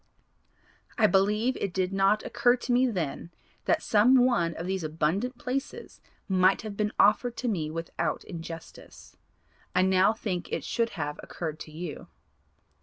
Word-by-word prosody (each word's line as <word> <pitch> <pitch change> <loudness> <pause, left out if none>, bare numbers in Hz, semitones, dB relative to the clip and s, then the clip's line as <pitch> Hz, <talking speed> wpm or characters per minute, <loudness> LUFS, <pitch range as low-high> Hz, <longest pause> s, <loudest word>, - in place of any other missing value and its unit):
I 225 - +5
believe 210 +5 +2
it 195 -3 -3
did 185 0 0
not 195 +2 +2
occur 240 +1 +3
to 250 0 -5
me 250 +2 +4
then 170 - -3 0.4
that - - +1
some 245 +4 +5
one 170 -10 +1
of 165 - -5
these 190 -1 -2
abundant 165 - -1
places 260 +3 -5 0.3
might 190 0 +3
have 215 -2 -6
been 210 0 -1
offered 215 +4 +3
to 250 - -3
me 165 -9 -1
without 165 +1 -3
injustice. 165 -2 -10 0.6
I 180 - +4
now 190 +1 +4
think 200 -5 -4
it - - -2
should 230 -1 0
have 150 -1 -3
occurred 155 -3 -6
to 155 - -9
you. 160 -1 -7
195 Hz, 155 wpm, -28 LUFS, 170-230 Hz, 0.6 s, I